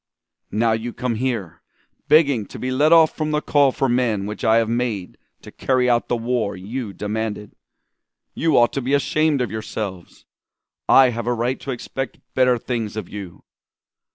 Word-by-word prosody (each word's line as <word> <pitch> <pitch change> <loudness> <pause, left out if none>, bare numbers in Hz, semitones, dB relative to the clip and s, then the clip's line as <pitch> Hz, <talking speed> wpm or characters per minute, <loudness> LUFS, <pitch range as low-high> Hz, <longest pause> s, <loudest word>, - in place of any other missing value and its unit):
"'Now 115 +2 +1
you 115 +2 -2
come 125 -1 -2
here, 115 -7 -3 0.5
begging 140 - +4
to - - -10
be 130 - -3
let 145 +5 +3
off 165 -2 +6
from 155 -1 -2
the 150 0 +1
call 145 -2 +3
for 135 - 0
men 120 -5 0
which 105 +1 -6
I 110 - +4
have 115 -1 +3
made 115 -5 -2 0.3
to - - -11
carry 130 -1 +1
out 120 -1 +2
the 120 - 0
war 115 -3 -1
you 110 +4 -5
demanded. 105 +1 -4 0.8
You 160 -2 +1
ought 120 0 +4
to 135 - -2
be 135 +3 +1
ashamed 155 0 +1
of 120 -5 -2
yourselves. 105 -4 -6 0.6
I 135 -1 +7
have 120 0 -5
a 120 - +2
right 120 +3 -1
to - - -9
expect 135 +2 -5
better 125 -1 +3
things 115 -3 -4
of 110 - -5
you! 100 -4 -9
120 Hz, 180 wpm, -21 LUFS, 110-130 Hz, 0.8 s, I